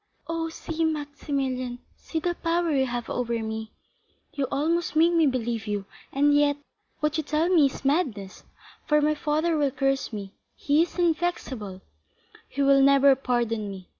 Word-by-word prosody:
"Oh, 330 0 -2
see, 325 0 -4
Maximilian, 280 -5 -2 0.2
see 325 - -4
the 350 +2 -1
power 335 0 0
you 265 -2 +2
have 240 -1 -4
over 235 -1 -1
me, 220 0 -5 0.6
you 280 -2 -1
almost 330 +4 0
make 330 +2 +4
me 330 -3 +4
believe 235 -4 -2
you; 205 -1 -2 0.3
and 290 +1 +3
yet, 290 0 +3 0.4
what 300 +1 +1
you 315 - -1
tell 305 +3 0
me 325 -6 +5
is 270 - -9
madness, 255 - -1 0.4
for 300 0 +4
my 300 +1 +2
father 310 +2 0
will 290 -2 +2
curse 270 0 -1
me—he 215 +8 -2
is 345 - -2
inflexible—he 260 - -4
will 275 0 +5
never 275 0 +6
pardon 235 -5 -1
me. 190 -2 -9
280 Hz, 155 wpm, -26 LUFS, 240-315 Hz, 0.6 s, never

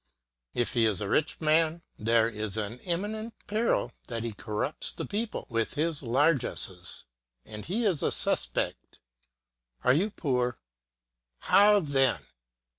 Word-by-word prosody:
If 120 - 0
he 115 -2 +4
is 105 -3 +1
a 105 - -3
rich 155 +9 0
man, 160 +1 +2 0.2
there 115 +1 +3
is 110 -2 -3
an 110 +3 -4
imminent 210 - -3
peril 215 - 0 0.2
that 115 -2 -4
he 115 -2 -3
corrupt 105 -1 -1
the - - -3
people 215 +2 -3
with 115 +1 -2
his 155 0 0
largesses, 125 - 0 0.4
and 105 -1 -8
he 220 +7 -1
is 180 -8 +2
a - - +1
suspect. - - -1 0.8
Are 125 - +5
you 185 +10 +2
poor? 125 - -1 0.8
How 205 0 +5
then! 135 - +2
135 Hz, 135 wpm, -28 LUFS, 115-170 Hz, 0.8 s, Are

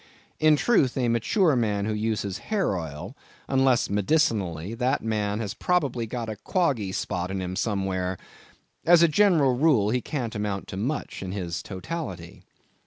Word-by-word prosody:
In 155 -1 +5
truth, 145 - +2
a 125 -2 +1
mature 145 - +2
man 105 -4 0
who 110 - -1
uses 105 -2 -2
hair 200 - +1
oil, 80 -4 -6 0.3
unless 130 -2 +3
medicinally, 100 - 0
that 125 +3 0
man 105 -1 -1
has 105 -4 -3
probably 140 -10 0
got 120 0 -4
a 110 -1 -5
quoggy 135 - 0
spot 90 -1 -3
in 95 0 -3
him 90 0 -4
somewhere. 95 -3 -1 0.7
As 170 0 +6
a - - +7
general 160 -7 +4
rule, 125 -7 +3
he 125 +1 +1
can't 125 -6 -4
amount 105 -2 -3
to - - -6
much 130 +9 -3
in 95 -1 -5
his 85 -4 -3
totality. 95 - -6
110 Hz, 160 wpm, -26 LUFS, 95-140 Hz, 0.7 s, a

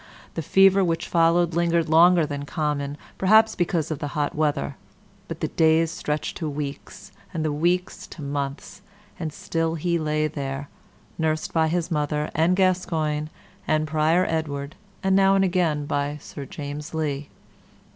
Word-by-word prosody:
The - - -3
fever 195 +4 +5
which 165 -2 -1
followed 170 0 +3
lingered 170 -1 +1
longer 170 +1 +6
than 145 -1 -4
common 145 -2 -2 0.2
perhaps 220 +3 +5
because 170 -3 -1
of 155 - -3
the 145 - -3
hot 145 -1 0
weather 150 -2 -1 0.5
and - - -5
the - - -1
days 160 0 +3
stretched 150 -3 -3
to 160 - -3
weeks, 145 +6 -6 0.2
and 160 -1 -1
the 155 - +1
weeks 175 +4 -1
to 160 - -10
months, 140 +4 -4 0.4
and 160 -3 -3
still 165 +1 -2
he 170 +1 0
lay 155 0 0
there, 140 -2 -4 0.5
nursed 155 -1 -1
by 160 -1 +3
his 175 +1 -1
mother 150 -1 -1
and 165 +4 +3
Gascoyne 165 -5 0 0.4
and 155 0 +1
Prior 160 +4 +2
Edward, 145 -3 -3 0.3
and 190 0 +3
now 195 0 +5
and 195 0 +3
again 170 -5 +1
by 145 0 -1
Sir 140 -1 -8
James 145 +3 -7
Lee. 145 -2 -2
160 Hz, 155 wpm, -24 LUFS, 150-170 Hz, 0.5 s, longer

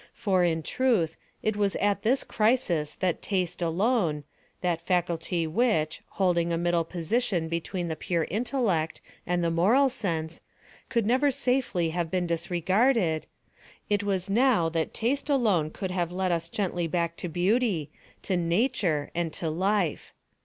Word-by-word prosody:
For, 190 -4 +1
in 165 -2 +1
truth, 205 - +1 0.3
it 215 -1 +1
was 205 -1 +1
at 205 -1 +1
this 250 +5 +2
crisis 180 -10 +1
that 180 -3 -1
taste 180 -3 -1
alone—that 170 - -1
faculty 175 -1 0
which, 160 -3 +1 0.2
holding 170 -3 +2
a 165 - +1
middle 175 0 +1
position 175 +2 -1
between 170 +2 -3
the 160 - -2
pure 165 +1 -1
intellect 210 - 0 0.3
and 175 0 +1
the 165 - +1
moral 225 +12 +4
sense, 170 -10 -3 0.5
could 235 -4 +1
never 260 +6 +3
safely 250 -11 0
have 170 -1 -2
been 180 +1 0
disregarded—it 185 +2 -1
was 195 -2 -1
now 220 -5 +3
that 165 -1 -1
taste 275 +6 -1
alone 210 - +2
could 190 +3 -5
have 175 -2 -1
led 185 0 -1
us 170 0 -1
gently 175 -4 -1
back 170 0 -1
to 175 - -4
Beauty, 180 - +1 0.3
to 190 - 0
Nature, 175 - 0
and 170 -1 -1
to 160 -2 -2
Life. 190 0 -1
180 Hz, 145 wpm, -27 LUFS, 165-215 Hz, 0.5 s, moral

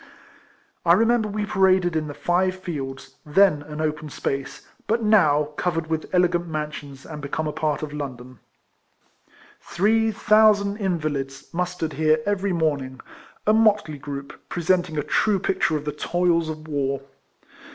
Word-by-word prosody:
I 170 - +5
remember 225 +2 +3
we 210 0 -2
paraded 185 -3 +3
in 155 -1 -1
the 145 - -7
Five 185 +1 +1
Fields, 145 -8 -7
then 150 0 +4
an 150 +1 -8
open 155 -1 -2
space, 135 -1 -4 0.2
but 225 +1 +1
now 155 -9 +4
covered 165 -2 -1
with 160 -1 -2
elegant 180 -1 +2
mansions, 150 -3 -6
and 150 -2 -8
become 145 +3 -3
a - - -1
part 150 0 -1
of 150 -1 -5
London. 130 -4 -7 1.2
Three 220 +6 +1
thousand 210 -1 +4
invalids 150 -8 -3
mustered 180 -2 -2
27G 135 - -10
RECOLLECTIONS 155 0 +4
OF 230 - -11
here 205 - +1
every 200 0 -1
morning 145 -6 -1 0.2
— - - -26
a 215 - +4
motley 210 -9 +3
group, 140 0 -7
pre 175 - -4
senting 175 -2 +1
a 150 - 0
true 205 +7 +2
picture 185 -4 0
of 150 - -7
the 150 - -1
toils 170 +2 0
of 155 0 -7
war. 140 -2 -2
160 Hz, 160 wpm, -23 LUFS, 150-190 Hz, 1.2 s, I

